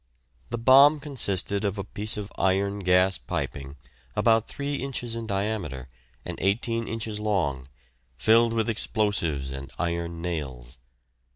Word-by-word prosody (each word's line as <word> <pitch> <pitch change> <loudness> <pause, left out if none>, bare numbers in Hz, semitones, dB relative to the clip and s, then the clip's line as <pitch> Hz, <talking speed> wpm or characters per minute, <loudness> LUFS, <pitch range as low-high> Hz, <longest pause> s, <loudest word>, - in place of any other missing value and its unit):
The 120 - -2
bomb 135 +6 +7
consisted 100 - -1
of 100 0 -1
a 100 - -2
piece 105 +2 -2
of 105 -1 -5
iron 100 +1 +1
gas 90 0 +3
piping 70 +1 -4 0.4
about 110 +1 +3
3 140 0 -3
inches 125 -3 -3
in 115 -1 -5
diameter 95 - -2 0.4
and - - -5
18 115 +4 0
inches 110 -2 -3
long, 85 -12 -1 0.5
filled 115 - +4
with 115 -1 0
explosives 100 - 0
and 70 0 -7
iron 85 -1 -2
nails. 70 -9 -4
100 Hz, 130 wpm, -26 LUFS, 85-115 Hz, 0.5 s, bomb